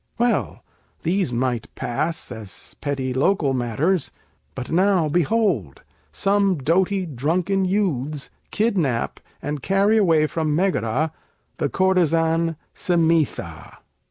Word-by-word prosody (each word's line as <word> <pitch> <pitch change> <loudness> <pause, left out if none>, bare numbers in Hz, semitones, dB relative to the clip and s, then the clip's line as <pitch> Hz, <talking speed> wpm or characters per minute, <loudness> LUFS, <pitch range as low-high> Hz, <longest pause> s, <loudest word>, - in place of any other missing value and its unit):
Well, 240 0 0 0.4
these 180 -3 +1
might 120 -1 -1
pass, 155 +6 -2
as 110 -5 -8
petty 135 -3 -2
local 140 +1 +2
matters. 135 - 0 0.4
But 130 -1 -6
now, 185 -1 +3
behold, 165 - 0 0.3
some 200 -1 +2
doughty 185 +7 +1
drunken 170 +7 0
youths 155 -8 -1 0.2
Kidnap, 180 - 0 0.2
and 145 -1 -3
carry 195 - +3
away 165 -7 +4
from 155 -1 -1
Megara, 155 - +1 0.5
The 145 - 0
courtesan, 165 -1 +2 0.2
Simætha. 160 - 0
165 Hz, 100 wpm, -22 LUFS, 135-190 Hz, 0.5 s, away